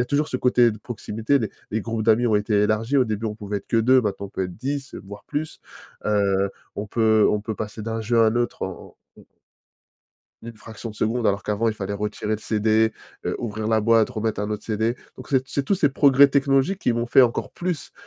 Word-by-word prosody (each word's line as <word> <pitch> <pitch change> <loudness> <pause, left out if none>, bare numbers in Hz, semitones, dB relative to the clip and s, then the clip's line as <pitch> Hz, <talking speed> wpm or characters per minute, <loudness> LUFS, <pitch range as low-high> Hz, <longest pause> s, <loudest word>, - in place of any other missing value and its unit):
a - - +2
toujours 145 +4 +1
ce 130 - -3
côté 125 -2 +3
de 105 - -10
proximité, 115 +3 -1
les 110 -6 -3 0.2
les 110 - -1
groupes 115 +1 -3
d'amis 115 +2 +3
ont 110 - +2
été 105 0 +2
élargis. 110 +6 +1
Au 130 - +4
début, 110 -1 -3
on 105 -1 -4
pouvait 105 -1 -4
être 100 - -21
que - - +1
2, 125 +3 +5
maintenant, 100 -3 -3
on - - -13
peut 95 - -4
être 90 -1 -8
10, 135 +3 -4
voire 100 +1 -10
plus. 155 +1 -4 0.4
Heu, 100 -2 +1 0.2
on 105 - -4
peut 110 -1 +3
on 105 - 0
peut 110 - -3
passer 105 +1 -6
d'un 115 +1 -3
jeu 115 +2 0
à - - +5
un 110 +2 +1
autre 120 0 -1
en 95 -1 -7 0.2
en - - -15
mmh. - - -18 1.2
une 115 -1 -9
fraction 110 +1 -8
de - - -13
seconde, 115 +2 0
alors 100 0 +1
qu'avant, 105 +4 0
il 110 - -1
fallait 100 -1 -4
retirer 105 +1 -3
le 110 - -1
CD, 110 +1 +1 0.3
heu, - - -1
ouvrir 110 -2 -4
la 110 -1 +3
boîte, 115 +1 +3
remettre 110 -3 -2
un 105 +1 -3
autre 105 -1 -4
CD. 110 +2 0 0.2
Donc, 130 - -11
c'est 135 -2 +3
t - - -19
c'est 140 - -1
tous 200 - +1
ces 160 -6 +2
progrès 140 0 +5
technologiques 140 +7 +1
qui 125 - +1
m'ont 120 0 -1
fait 130 - +6
encore 120 -2 0
plus 175 -7 -4
110 Hz, 240 wpm, -23 LUFS, 105-125 Hz, 1.2 s, fait